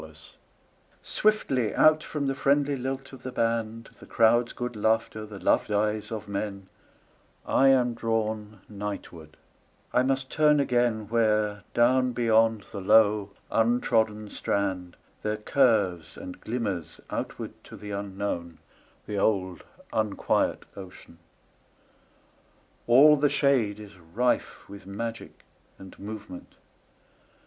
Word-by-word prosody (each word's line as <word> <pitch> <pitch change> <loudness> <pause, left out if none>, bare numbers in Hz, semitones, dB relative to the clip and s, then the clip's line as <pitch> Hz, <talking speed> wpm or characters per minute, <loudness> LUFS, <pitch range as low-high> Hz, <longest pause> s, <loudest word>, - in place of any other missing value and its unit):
Seaside 80 0 -14 0.7
SWIFTLY 135 - +1
out 155 0 +5
from 150 -2 -3
the 135 - 0
friendly 140 +1 +1
lilt 135 +1 -5
of 135 - -11
the 130 - -6
band, 115 -1 -2
The - - -14
crowd's 120 +1 +3
good 125 -1 -5
laughter, 110 0 0
the 105 -1 -9
loved 100 - +1
eyes 105 +1 0
of 110 -2 -5
men,I 100 +6 -4
am 125 -3 +4
drawn 110 -2 -3
nightward; 100 -6 -7 0.6
I 125 - +4
must 135 0 -1
turn 150 -1 +4
againWhere, 110 -5 +1
down 125 +1 +3
beyond 115 -2 +2
the 100 - -6
low 105 0 +4 0.2
untrodden 110 -2 +1
strand, 95 -3 -2 0.3
There 105 0 -2
curves 105 - +1
and 90 - -9
glimmers 105 -8 -4
outward - - -6
to - - -11
the 105 0 -8
unknownThe 100 0 -6
old 95 -4 0 0.3
unquiet 110 -2 0
ocean. 95 -3 -12 1.7
All 145 +6 +7
the 145 +1 +3
shadeIs 105 -9 0 0.2
rife 125 +1 0
with 100 -1 -12
magic 115 +3 -6 0.3
and 95 -1 -13
movement. 105 -3 -9
110 Hz, 110 wpm, -27 LUFS, 100-125 Hz, 1.7 s, All